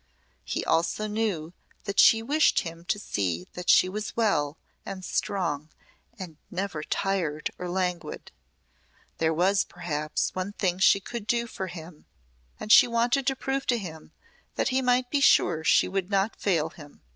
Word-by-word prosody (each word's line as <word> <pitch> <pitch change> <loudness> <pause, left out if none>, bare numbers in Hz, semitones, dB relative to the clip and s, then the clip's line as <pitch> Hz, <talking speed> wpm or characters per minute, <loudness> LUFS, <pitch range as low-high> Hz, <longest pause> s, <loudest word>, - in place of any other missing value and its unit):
He - - -3
also 170 +6 +1
knew 210 -7 -2 0.3
that 200 -1 -2
she 225 0 +6
wished 300 +6 +3
him 165 0 -8
to 205 - 0
see 90 - -3
that 180 0 -5
she - - +6
was 210 +4 -5
well 155 -10 +1 0.3
and 185 -1 -7
strong 165 -7 -2 0.5
and 175 -6 -8
never 180 -4 -3
tired 165 -3 -2
or 180 - -4
languid. 180 -1 -3 0.9
There 160 0 +2
was, 190 +5 +2
perhaps, 155 -3 -3
one 185 +2 -4
thing 185 -3 -1
she 195 +1 +5
could 225 +1 -7
do 235 +1 +1
for 195 -5 -6
him 165 -2 -11 0.5
and 215 - -3
she - - +9
wanted 240 +3 +1
to 270 - +2
prove 270 +1 -3
to 245 - +2
him 160 -7 -9 0.4
that - - 0
he 260 0 +1
might 250 0 +1
be 285 - +1
sure 160 - +4
she - - +4
would 190 0 -2
not 200 +2 +1
fail 165 -6 0
him. 145 -3 -15
190 Hz, 165 wpm, -27 LUFS, 165-220 Hz, 0.9 s, she